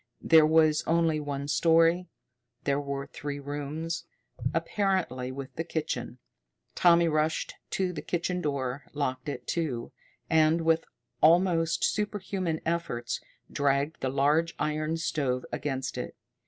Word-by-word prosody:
There 160 -2 +7
was 155 -1 +4
only 165 -2 +2
one 140 -1 -4
story, 165 +2 +5
and 180 0 -9 0.6
there 140 +1 +1
were 140 -1 -4
three 145 0 -6
rooms, 145 +4 -4 0.5
apparently, 165 -7 0
with 135 0 -7
the 165 - 0
kitchen. 150 -7 -3 0.6
Tommy 170 -1 +5
rushed 155 0 0 0.2
to 185 -2 -1
the 150 - -5
kitchen 180 +2 -2
door, 140 -2 -2
locked 130 -2 -2
it, 125 -3 -5
too, 135 -8 -2 0.4
and, 160 +1 +4
with 165 0 +2 0.4
almost 170 0 +4
super 210 0 0
human 185 -4 -2
efforts, 165 -8 -2 0.3
dragged 140 +2 0
the 130 - 0
large 150 +5 +2
iron 155 +2 -1
stove 140 -6 -1
against 135 -3 -3
it. - - -5
155 Hz, 130 wpm, -28 LUFS, 140-165 Hz, 0.6 s, There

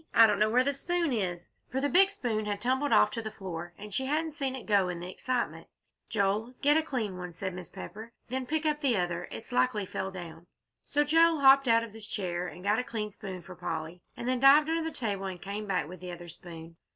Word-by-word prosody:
"I 225 - +9
don't 210 -2 +2
know 215 +1 +4
where 250 +3 +4
the 280 +2 +1
spoon 340 +1 -1
is," 175 -6 -2 0.2
for 260 - -1
the 285 - +1
big 385 +6 +6
spoon 235 - -2
had 205 -1 -2
tumbled 260 +5 +1
off - - +5
to 230 - -3
the 220 - -4
floor, 175 -5 -7
and 210 0 -9
she 265 +6 0
hadn't 315 +3 0
seen 275 -4 -2
it 260 - -8
go 200 -4 +3
in 175 -1 -4
the 175 +1 -6
excitement. 250 +5 -2 0.4
"Joel, 215 +3 0
get 290 +1 +6
a 320 - +4
clean 220 -11 -3
one," 180 -1 -6
said 185 +2 -4
Mrs. 180 -1 -9
Pepper, 200 +2 -8
"and 230 +1 -11 0.2
then 260 0 -3
pick 315 +2 -1
up 300 -1 +1
the 260 -7 +3
other; 175 -1 -2
it's 225 - -8
likely 245 -4 +2
it 190 - -9
fell 190 - -3
down." 175 -3 -9 0.3
So 295 +1 +1
Joel 325 +1 +4
hopped 275 0 +7
out 230 0 +5
of 225 -3 -8
his 220 -1 -7
chair 180 -3 -2
and 180 - -10
got 210 +3 +2
a - - -1
clean 215 -3 -4
spoon 190 -4 -7
for 185 - -10
Polly, 165 +1 -5 0.2
and 240 - -5
then 255 0 +1
dived 285 +4 +7
under 330 0 +1
the 325 - -2
table 205 -9 -2
and 185 -2 -5
came 205 +3 -5
back 185 -5 0
with 180 +2 -9
the 180 0 -7
other 175 0 -9
spoon. 165 0 -10
215 Hz, 255 wpm, -30 LUFS, 185-265 Hz, 0.4 s, I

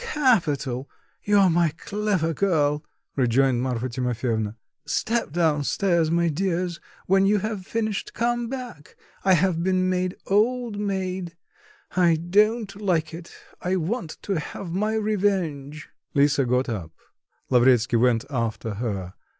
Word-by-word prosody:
"Capital; 160 - +1 0.3
you're 200 -3 +4
my 170 0 +3
clever 200 -6 -1
girl," 150 -5 +1 0.3
rejoined 130 -1 +2
Marfa 125 -1 -1
Timofyevna. 120 -3 -2 0.3
"Step 230 -8 -1
down 155 -3 +1
stairs, 170 0 +1
my 170 +1 +2
dears; 175 +1 -1 0.3
when 195 +1 +4
you 210 +1 +4
have 205 -2 -4
finished, 220 -3 -2
come 240 0 0
back: 245 - -8 0.3
I 190 - +5
have 175 -1 +2
been 185 +1 +1
made 180 0 -1
old 225 +1 +1
maid, 190 -4 -3 0.6
I 175 -3 +4
don't 205 +5 +1
like 165 -5 0
it, 165 +1 -9 0.3
I 180 +1 0
want 185 +1 -3
to 195 -5 -1
have 170 +3 -7
my 210 +5 0
revenge." 185 -9 -1 0.3
Lisa 140 -1 +3
got 125 +2 +1
up. 90 -9 -5 0.6
Lavretsky 125 -1 +4
went 115 -1 +2
after 115 -3 -2
her. 95 -6 -3
170 Hz, 130 wpm, -24 LUFS, 135-200 Hz, 0.6 s, I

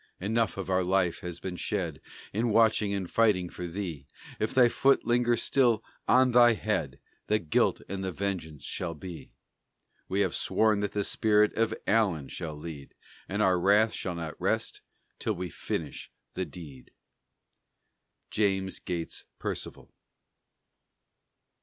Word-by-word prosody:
Enough 110 +2 0
of 95 - -4
our 95 0 +2
life 90 -1 +1
has 90 -1 -6
been 90 -1 -5
shed, 90 -9 -2 0.3
In 115 +4 +1
watching 110 -2 +3
and 100 -3 -2
fighting 95 -4 +2
for 90 - -6
thee; 85 -6 -5 0.3
If 110 - 0
thy 125 -2 +6
foot 135 +3 +3
linger 120 0 +2
still 120 -3 +2 0.2
on 130 0 +5
thy 120 -1 +7
head 80 -12 -2 0.3
The 105 - +3
guilt 80 -7 +1
and 95 -1 -4
the 95 - -2
vengeance 90 -6 -3
shall 85 -2 -4
be: 85 +2 -9 0.8
We - - +1
have - - +1
sworn 110 -2 +2
that 105 -1 -2
the 105 - 0
spirit 105 0 +3
of 115 0 +1
ALLEN 95 -10 +2
shall 80 -3 -5
lead, 75 -2 -9 0.3
And 100 +2 0
our 95 -2 +3
wrath 105 +4 +4
shall 90 -2 -3
not 80 -2 -6
rest, - - -1 0.4
till - - 0
we 90 -1 -5
finish 75 0 -5 0.2
the 95 - -2
deed. 75 -9 -11 1.4
JAMES 95 -2 0
GATES 85 -2 -4
PERCIVAL. - - -6
95 Hz, 145 wpm, -29 LUFS, 85-110 Hz, 1.4 s, thy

